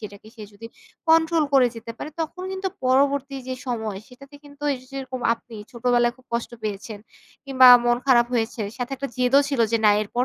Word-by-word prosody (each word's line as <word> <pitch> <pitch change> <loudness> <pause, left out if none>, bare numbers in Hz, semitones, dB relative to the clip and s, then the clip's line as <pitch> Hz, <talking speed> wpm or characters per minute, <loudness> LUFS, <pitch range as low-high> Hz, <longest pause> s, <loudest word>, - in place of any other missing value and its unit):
সেটাকে 205 0 -11
সে 220 - -10
যদি 205 +3 -11 0.4
control 320 0 +4
করে 260 -2 +6
যেতে 230 0 -8
পারে। - - -6
তখন 325 +3 -5
কিন্তু 380 0 -3 0.2
পরবর্তী 275 +1 +1
যে 260 - -2
সময় 220 -5 -3
সেটাতে 275 +3 -16
কিন্তু 285 0 -16
এইযে 255 -1 -8
যেরকম 260 -1 -6
আপনি 230 0 -16 0.2
ছোটবেলায় 240 0 +1
খুব 255 -1 -24
কষ্ট 235 - -2
পেয়েছেন 210 +1 -5 0.5
কিংবা 260 -2 +5 0.2
মন 240 0 +3
খারাপ 240 -3 +5
হয়েছে 230 0 -2 0.2
সাথে 245 +1 -5
একটা 275 +1 -5
জেদও 255 +2 +4
ছিল 275 -4 -1
যে 230 - +3
না 210 - +7
এরপর 240 +4 -2
255 Hz, 185 wpm, -23 LUFS, 230-275 Hz, 0.5 s, না